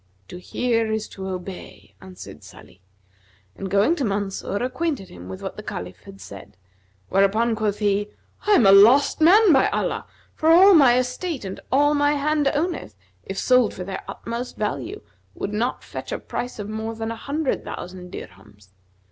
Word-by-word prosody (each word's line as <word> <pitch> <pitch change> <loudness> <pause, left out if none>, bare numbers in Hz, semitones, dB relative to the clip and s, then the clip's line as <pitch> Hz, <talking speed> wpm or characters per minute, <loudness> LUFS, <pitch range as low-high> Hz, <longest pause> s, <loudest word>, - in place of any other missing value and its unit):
"To 180 - -8
hear 230 +3 -1
is 220 0 -2
to 190 -1 -7
obey," 185 0 -8
answered 185 -1 -12
Salih 95 - -16 0.7
and, 195 - -6
going 200 - +3
to 280 - -1
Mansur, 200 -2 -2
acquainted 260 - -3
him 90 +1 -11
with 95 - -8
what - - -6
the - - -6
Caliph 90 +1 -7
had 95 0 -12
said, 100 -1 -12 0.5
whereupon 215 +4 +2
quoth 210 -2 -1
he, 205 0 0 0.4
"I 420 - +5
am 245 - +5
a 195 - +7
lost 235 +11 +6
man, 380 +3 +6
by 265 - +4
Allah; - - -2 0.3
for 315 - 0
all 375 +4 +8
my 270 -7 +6
estate 255 - -3
and 190 - -6
all 290 +2 +4
my 290 0 +2
hand 295 0 0
owneth, 300 - -2 0.3
if 195 - -7
sold 250 -3 +3
for 180 - -6
their 190 +1 -6
utmost 235 +2 -6
value, 345 - -4 0.3
would 205 - -4
not 235 +4 -2
fetch - - -8
a - - -1
price 245 - -6
of 205 -1 -6
more 220 +1 -4
than 225 0 -4
an 230 - -6
hundred 285 +4 -2
thousand 180 0 -8
dirhams. 100 - -12
220 Hz, 175 wpm, -23 LUFS, 195-280 Hz, 0.7 s, all